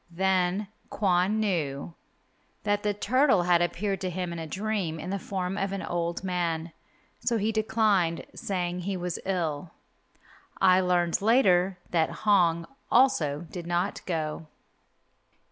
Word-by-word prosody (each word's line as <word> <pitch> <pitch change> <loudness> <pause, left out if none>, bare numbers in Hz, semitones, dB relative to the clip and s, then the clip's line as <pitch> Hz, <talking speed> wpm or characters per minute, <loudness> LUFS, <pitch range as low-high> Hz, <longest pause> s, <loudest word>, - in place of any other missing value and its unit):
Then 190 +2 +1 0.2
Kwon 190 +1 +1
knew 165 -7 -1 0.7
that 205 -1 +1
the 210 - +1
turtle 235 0 +3
had 175 -1 +3
appeared 195 +2 -1
to 185 - -1
him 180 -1 -3
in 170 - -5
a 160 - -5
dream 190 -3 -2
in 180 +4 -5
the 200 - -2
form 190 0 -3
of 195 0 -1
an 195 - -3
old 170 +1 -2
man, 170 -3 -2 0.5
so 235 - 0
he 215 +1 0
declined, 215 -6 +1
saying 180 -2 -3
he 190 +1 -3
was 180 -1 -3
ill. 165 -4 -2 0.8
I 185 0 +6
learned 180 -2 +1
later 195 -5 +4
that 165 -2 +2 0.2
Hong 170 -5 +4 0.3
also 160 - +3
did 175 -2 -6
not 175 +2 -1
go. 160 -2 -3
180 Hz, 140 wpm, -27 LUFS, 170-200 Hz, 0.8 s, I